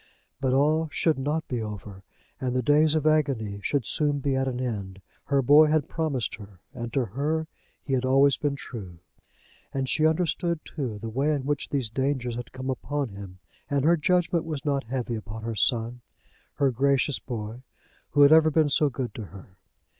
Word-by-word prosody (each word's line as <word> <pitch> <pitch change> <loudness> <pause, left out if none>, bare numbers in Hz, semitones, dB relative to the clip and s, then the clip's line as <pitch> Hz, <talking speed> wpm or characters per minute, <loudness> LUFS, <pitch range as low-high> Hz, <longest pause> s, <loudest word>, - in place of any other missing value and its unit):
But 135 -2 0
all 155 +4 +2
should 155 -2 +1
not 150 +4 -1
be 125 -3 -2
over, 105 -2 -7 0.4
and 125 -1 -2
the 125 - +1
days 150 +4 +4
of 155 -1 0
agony 135 -10 +1
should 140 +2 0
soon 145 +3 +1
be 140 -1 -1
at 135 0 0
an 125 -1 -2
end. 100 -7 -4 0.3
Her 140 -2 +2
boy 150 +4 +7
had 155 -2 +1
promised 150 -8 -2
her, 100 -4 -13
and 120 -3 -5
to 135 -3 +1
her 145 +9 -1 0.4
he 135 - -3
had 130 -1 +1
always 135 +2 +4
been 145 -1 -1
true. 100 -11 -8 0.7
And 135 -1 -2
she 155 +4 +3
understood, 170 0 0
too, 125 -8 -4
the 115 - -6
way 135 +7 0
in 145 -3 -1
which 145 0 -2
these 130 -7 -1
dangers 130 -2 -1
had 120 0 -7
come 130 0 -4
upon 140 +1 -3
him, 100 -2 -10 0.3
and 140 -1 +1
her 170 +2 +5
judgment 170 +1 +1
was 155 -4 -5
not 140 -4 0
heavy 125 0 -3
upon 110 0 -6
her 115 0 -3
son; 115 +2 0 0.5
her 140 -2 +2
gracious 140 +2 +1
boy, 115 -1 -6 0.5
who 145 - +5
had 140 - +7
ever 160 0 +7
been 155 -1 +3
so 145 +1 +3
good 130 -2 -4
to 110 - -6
her! 95 0 -14
135 Hz, 190 wpm, -26 LUFS, 115-150 Hz, 0.7 s, boy